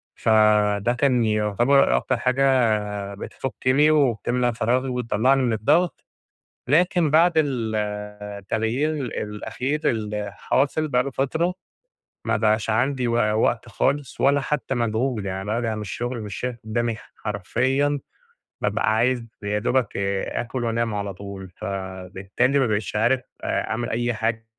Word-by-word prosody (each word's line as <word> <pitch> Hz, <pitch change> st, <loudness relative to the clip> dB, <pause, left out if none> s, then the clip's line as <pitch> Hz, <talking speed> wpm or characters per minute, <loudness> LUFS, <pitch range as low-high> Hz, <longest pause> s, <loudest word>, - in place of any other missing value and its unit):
فده 105 Hz, 0 st, +3 dB
كان 125 Hz, -2 st, +2 dB
يُعتبر 110 Hz, +6 st, +3 dB
أكتر 130 Hz, -, 0 dB
حاجة 115 Hz, -6 st, +1 dB
بتفكني 130 Hz, +7 st, +1 dB
وبتملا 125 Hz, -3 st, +2 dB
فراغي 125 Hz, +4 st, 0 dB
وتطلعني 125 Hz, +2 st, +2 dB
من 120 Hz, -3 st, +1 dB
الضغط، 150 Hz, -, +1 dB, 0.6 s
لكن 175 Hz, +2 st, +3 dB
بعد 170 Hz, +2 st, +5 dB
ال 125 Hz, -8 st, 0 dB, 0.6 s
التغيير 115 Hz, +10 st, -1 dB, 0.3 s
الأخير 125 Hz, +7 st, -3 dB
اللي 105 Hz, -2 st, -3 dB
حاصل 145 Hz, +3 st, +1 dB
بقى 125 Hz, -3 st, +2 dB
له 140 Hz, -, -4 dB
فترة، 160 Hz, +8 st, 0 dB, 0.7 s
ما -, -, +1 dB
بقاش 110 Hz, 0 st, +1 dB
عندي 125 Hz, +2 st, +1 dB
و 115 Hz, -, 0 dB, 0.3 s
وقت 120 Hz, 0 st, +1 dB
خالص 140 Hz, +3 st, -1 dB
ولا 140 Hz, +1 st, +4 dB
حتى 135 Hz, -1 st, -2 dB
مجهود، 115 Hz, -1 st, -1 dB
يعني 95 Hz, 0 st, -4 dB
بارجع 110 Hz, +1 st, -1 dB
من 110 Hz, -, -5 dB
الشغل 120 Hz, +4 st, -4 dB
مش 105 Hz, -2 st, -6 dB
شايف 125 Hz, -1 st, -3 dB
قدامي 115 Hz, 0 st, -1 dB, 0.2 s
حرفيًا، 130 Hz, +8 st, 0 dB, 0.6 s
بابقى 110 Hz, -, +1 dB
عايز 120 Hz, +1 st, +1 dB, 0.2 s
يا 105 Hz, +1 st, 0 dB
دوبك 125 Hz, 0 st, 0 dB, 0.3 s
آكل 120 Hz, +1 st, -3 dB
وأنام 115 Hz, -1 st, 0 dB
على 100 Hz, -1 st, -3 dB
طول، 95 Hz, 0 st, -8 dB
فبالتالي 95 Hz, +5 st, -2 dB
ما 130 Hz, -, +2 dB
بقيتش 105 Hz, -1 st, -2 dB
عارف 125 Hz, +4 st, +2 dB, 0.2 s
أ -, -, -1 dB
أعمل 120 Hz, +2 st, -2 dB
أي 120 Hz, +1 st, 0 dB
حاجة 115 Hz, 0 st, -2 dB
120 Hz, 130 wpm, -23 LUFS, 105-135 Hz, 0.7 s, بعد